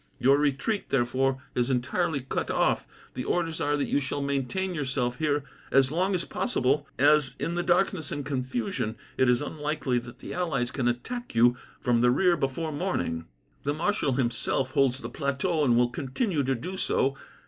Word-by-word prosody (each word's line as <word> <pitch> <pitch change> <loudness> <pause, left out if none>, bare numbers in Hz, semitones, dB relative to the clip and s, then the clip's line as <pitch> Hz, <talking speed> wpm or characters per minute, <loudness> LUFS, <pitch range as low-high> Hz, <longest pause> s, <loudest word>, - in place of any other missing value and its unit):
Your 135 +3 +4
retreat, 150 +9 0
therefore, 130 +1 +1
is 125 +1 0
entirely 140 +4 0
cut 130 - -3
off. - - +1 0.3
The 125 - -4
orders 165 +1 -1
are 145 0 +1
that 145 - 0
you - - +2
shall 135 +1 -3
maintain 140 +7 -1
yourself 130 -5 -1
here 150 -2 +1 0.3
as 135 0 +4
long 185 +4 +1
as 175 - -1
possible, 145 - 0
as 145 -1 +4
in 170 - -2
the 175 - 0
darkness 175 -2 +1
and 145 - -3
confusion, 130 -5 -2 0.2
it 130 - +3
is 125 +3 +3
unlikely 150 -4 -1
that 120 +1 -11
the - - -8
allies 145 -9 -1
can 130 -3 -1
attack 235 - -3
you 120 +1 +5 0.3
from 120 -2 +2
the 125 - +5
rear 175 +7 +4
before 155 +2 -2
morning. 90 - -2 0.3
"The 145 +1 -1
marshal 165 -4 0
himself 130 +1 0
holds 135 -2 +3
the 115 - -6
plateau, 140 +5 0
and 120 -4 +4
will 120 0 +4
continue 150 - -1
to 135 0 +1
do 180 +10 -5
so. 135 -6 +1
140 Hz, 180 wpm, -27 LUFS, 125-160 Hz, 0.3 s, you